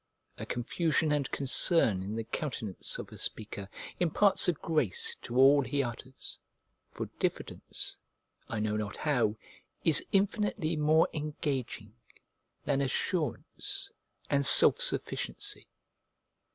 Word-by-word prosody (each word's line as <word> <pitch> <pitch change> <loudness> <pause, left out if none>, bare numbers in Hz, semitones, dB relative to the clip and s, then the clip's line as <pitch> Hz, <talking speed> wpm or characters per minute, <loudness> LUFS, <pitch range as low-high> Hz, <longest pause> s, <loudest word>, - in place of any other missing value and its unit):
A - - -6
confusion 155 +5 0
and 145 -3 0
concern 135 - +2
in 100 +3 -5
the 115 - -3
countenance 115 - -4
of - - -8
a - - -11
speaker 100 -2 -3 0.3
imparts 185 +4 +2
a 180 - +3
grace 450 - -1
to - - -8
all 140 +2 +6
he 140 +2 -1
utters; 125 +2 -8 0.5
for - - -5
diffidence, - - -2 0.5
I 110 - -3
know 105 0 -1
not 105 -1 -4
how, 125 -8 0 0.5
is 160 - +3
infinitely 200 -4 0
more 155 +2 +3
engaging 140 - -4 0.7
than 135 - +1
assurance 140 - -2 0.4
and 140 0 +1
self - - +9
sufficiency. - - -2
140 Hz, 115 wpm, -30 LUFS, 115-160 Hz, 0.7 s, self